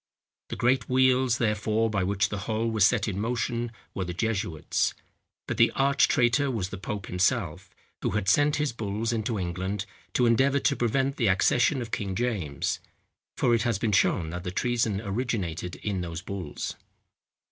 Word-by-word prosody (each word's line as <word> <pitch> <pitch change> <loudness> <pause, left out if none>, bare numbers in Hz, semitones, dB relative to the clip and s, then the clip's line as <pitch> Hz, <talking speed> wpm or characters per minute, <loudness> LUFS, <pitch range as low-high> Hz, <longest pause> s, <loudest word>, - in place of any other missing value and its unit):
The - - -4
great 125 +2 +1
wheels, 130 -1 +3
therefore, 110 0 +1
by 100 -3 0
which 100 +1 +1
the 100 - -3
whole 115 +1 0
was 110 -2 +5
set 115 -3 +1
in 100 -2 -2
motion, 120 +1 -1 0.2
were 95 - -2
the 90 -1 -5
jesuits; 100 -7 -1 0.5
but - - -3
the - - +6
arch 140 +1 +4
traitor 125 +3 +3
was 105 -7 -2
the 100 - -7
pope 100 0 -4
himself, 90 0 0 0.3
who - - 0
had 100 -2 -2
sent 145 +9 +4
his 150 -4 -1
bulls 110 +1 -2
into 110 0 -1
England, 95 +2 -3 0.3
to 125 - +3
endeavour 130 +4 +3
to - - +2
prevent 135 +4 0
the 120 - +2
accession 120 +7 +3
of 115 - -10
King 95 -2 -2
James; 100 - -1 0.6
for 120 - +3
it 115 - +3
has 115 -2 +1
been 105 +1 0
shown 85 -4 +2
that 90 +1 -5
the 90 - -3
treason 115 0 0
originated 95 - -3
in 95 +3 -3
those 85 0 -5
bulls. 90 -7 -5
110 Hz, 175 wpm, -27 LUFS, 95-120 Hz, 0.6 s, the